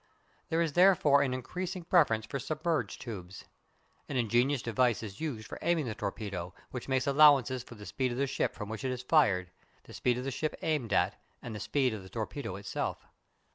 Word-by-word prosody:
There 165 +1 +2
is 160 -3 -2
therefore 170 -6 +5
an 140 -2 +1
increasing 180 +8 -4
preference 145 -11 +3
for 140 - -4
submerged 155 +4 -2
tubes. 95 -6 -8 0.6
An 135 - -2
ingenious 120 +3 +2
device 120 0 +1
is 100 +2 -8
used 130 -9 -4
for - - -8
aiming 170 -4 +1
the 115 - -3
torpedo, 100 -4 -5 0.2
which 125 - -6
makes 130 -1 +1
allowances 140 -3 +5
for 120 - -12
the 105 -1 -11
speed 130 +2 -1
of 120 - -4
the 140 - +2
ship 135 - -1
from 105 - -6
which 110 -1 -6
it 130 - 0
is 125 -1 -4
fired, 100 - +3 0.3
the - - -14
speed 125 -1 +1
of 125 - -3
the 135 - -2
ship 155 +4 -2
aimed 150 -9 0
at, - - +1 0.2
and 120 - -7
the 105 - -5
speed 130 -2 +1
of 105 - -5
the 95 - -12
torpedo 115 -1 -4
itself. 100 0 -4
125 Hz, 205 wpm, -31 LUFS, 110-145 Hz, 0.6 s, therefore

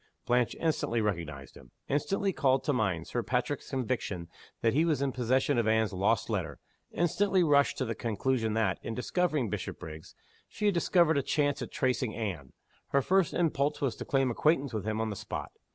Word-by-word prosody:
Blanche 120 -1 +2
instantly 155 -7 0
recognized 85 -10 -3
him; 65 - -15 0.2
instantly 195 +7 0
called 135 -3 +2
to 145 - +1
mind 95 -9 0
Sir 120 - -2
Patrick's 125 +4 -2
conviction 120 -9 -2 0.3
that 115 - +2
he 155 +4 +3
was 160 -4 +1
in 140 -1 0
possession 125 0 +1
of 115 - +1
Anne's 110 -1 +2
lost 100 +5 +1
letter; 90 -10 -2 0.3
instantly 185 +3 +2
rushed 145 -3 +3
to 130 - -1
the 115 - -2
conclusion 115 0 -1
that, 105 -4 +1
in 115 - -5
discovering 150 0 0
Bishopriggs, 80 -4 -6 0.3
she 210 - -4
had 205 - +4
discovered 170 -3 +3
a - - +1
chance 145 +1 0
of - - -4
tracing 125 -3 -1
Anne. 90 - -4 0.4
Her 140 -1 +2
first 190 +1 +2
impulse 150 -4 +1
was 130 -6 -1
to - - -5
claim 135 -2 +2
acquaintance 140 0 +1
with 105 -2 -3
him 110 0 -1
on 110 -1 -1
the - - -4
spot. 105 +1 -5
125 Hz, 185 wpm, -30 LUFS, 110-145 Hz, 0.4 s, had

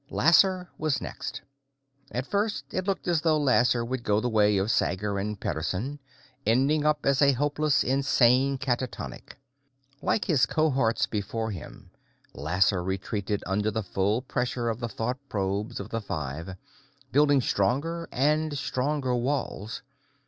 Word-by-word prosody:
Lasser 180 +2 +4
was 155 -3 0
next. - - -6 0.7
At 125 0 -2
first, 205 +5 -1
it 185 +1 -2
looked 195 -2 -2
as 170 -3 +2
though 155 -1 +3
Lasser 125 -4 +3
would 130 +1 -3
go 105 -1 +2
the 125 +2 -1
way 105 -2 +4
of 100 +3 +1
Sager 100 0 0
and 105 0 -3
Pederson, 95 - -3 0.4
ending 135 +6 +2
up 150 -1 +1
as 140 0 +3
a 140 -1 +6
hopelessly 145 0 +1
insane 135 0 +3
catatonic. 125 -5 -4 0.7
Like 220 - +1
his 155 -9 +3
cohorts 135 -7 +2
before 110 +2 -3
him, 95 -6 -10 0.4
Lasser 90 +4 +1
retreated 95 +2 -2
under 105 +3 0
the 110 +1 -2
full 100 +5 0
pressure 125 -2 -1
of 115 0 -3
the 120 -1 -3
thought 125 +3 -3
probes 100 +1 -2
of - - -6
the 115 - -3
five, 80 0 -5 0.6
building 145 0 +4
stronger 140 +10 0
and 150 +2 +1
stronger 135 0 -1
walls. 120 -4 -2
125 Hz, 140 wpm, -27 LUFS, 105-145 Hz, 0.7 s, a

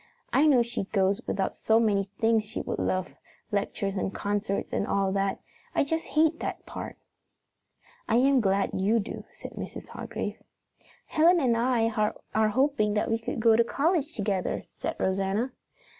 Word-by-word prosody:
I 300 +3 +5
know 260 -5 +5
she 235 -4 -4
goes 195 +2 +1
without 195 -1 -1
so 220 0 +2
many 205 -3 +2
things 225 -1 +3
she 225 - -4
would - - -4
love 185 -1 -1 0.4
lectures 200 -1 -1
and 190 - -1
concerts 205 0 -2
and 200 - 0
all 195 -1 +1
that. 195 0 0 0.4
I - - +4
just 325 +3 -2
hate 320 +1 +2
that - - -4
part!" - - -7 1.1
"I 225 - +3
am 265 +1 +4
glad 195 -1 +1
you 200 +5 +2
do," 200 - -6
said - - -10
Mrs. - - -7
Hargrave. - - -5 0.6
"Helen 340 +3 +4
and 250 -6 +2
I 230 -1 +2 0.4
are 220 0 +3
hoping 220 -3 +2
that 210 - 0
we 225 - +1
can 225 - -4
go 225 0 +5
to 235 - +5
college 315 +5 0
together," 200 -3 -1 0.2
said - - -2
Rosanna. 195 +6 0
220 Hz, 165 wpm, -28 LUFS, 195-260 Hz, 1.1 s, I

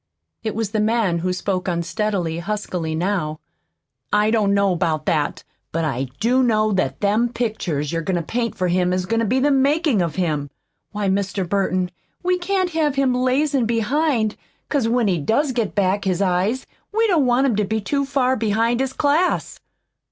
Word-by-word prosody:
It 220 -2 -3
was 220 -2 -2
the 215 - 0
man 210 -5 +1
who 185 +2 -1
spoke 185 0 -2
unsteadily, 175 -1 -1
huskily, 175 -4 -3
now. 165 -3 -1 0.7
"I 210 +1 +3
don't 215 -3 +2
know 200 -1 +3
about 160 -3 -1
that, 150 -3 0 0.3
but 165 0 -1
I 135 -3 -2
do 250 +4 +3
know 215 -3 +2
that 190 -2 -1
them 215 +4 +2
pictures 195 -11 -2
you're 165 - 0
goin' 185 +3 -1
to 170 - -1
paint 230 +6 -2
for 185 - 0
him 180 0 +1
is 185 0 -1
goin' 230 +4 0
to 230 - +1
be 255 +5 +2
the 290 +2 +3
makin' 280 - +2
of 170 -3 -2
him. 150 -6 -1 0.4
Why, 205 -1 -2
Mr. 195 -1 -1
Burton, 185 -1 0 0.3
we 365 0 +1
can't 370 0 0
have 310 -4 +1
him 270 -2 +2
lazin' 260 0 +1
behind, 235 0 +1 0.3
'cause 275 -6 +1
when 235 -1 +2
he 180 -4 +1
does 260 - +1
get 230 -5 -2
back 200 0 +1
his 185 -2 0
eyes 195 +6 0 0.3
we 450 +2 +2
don't 335 - +3
want 245 +2 +3
him 250 -6 +2
to 210 - +2
be 220 +2 -1
too 280 +7 -1
far 270 -2 +1
behind 230 +1 +1
his 265 0 -1
class." 305 +7 +1
215 Hz, 190 wpm, -21 LUFS, 185-255 Hz, 0.7 s, I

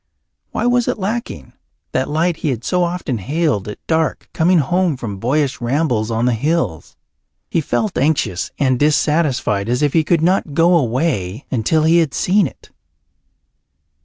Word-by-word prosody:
Why - - -2
was 245 -1 +2
it - - 0
lacking, 200 - -4 0.4
that 130 - -1
light 160 +2 0
he 155 - -2
had 120 -3 -3
so 180 +5 +1
often 170 -9 -2
hailed 145 - -1
at 105 - -6
dark, 160 -1 -1
coming 175 +3 +3
home 170 +1 +1
from 105 -6 -6
boyish 135 +4 0
rambles 120 -3 0
on 115 +1 0
the 125 - +2
hills? 120 - -2 0.6
He 165 - +1
felt 205 +7 -1
anxious 135 - 0
and 130 -3 +1
dissatisfied, 145 -8 +1
as 125 +4 0
if 145 - +1
he 160 - +3
could 160 0 +1
not 175 -4 +1
go 170 +3 +4
away 125 - -1
until 135 +6 +1
he 165 +2 +4
had 160 -5 0
seen 195 -1 +2
it. - - -15
150 Hz, 160 wpm, -18 LUFS, 120-170 Hz, 0.6 s, go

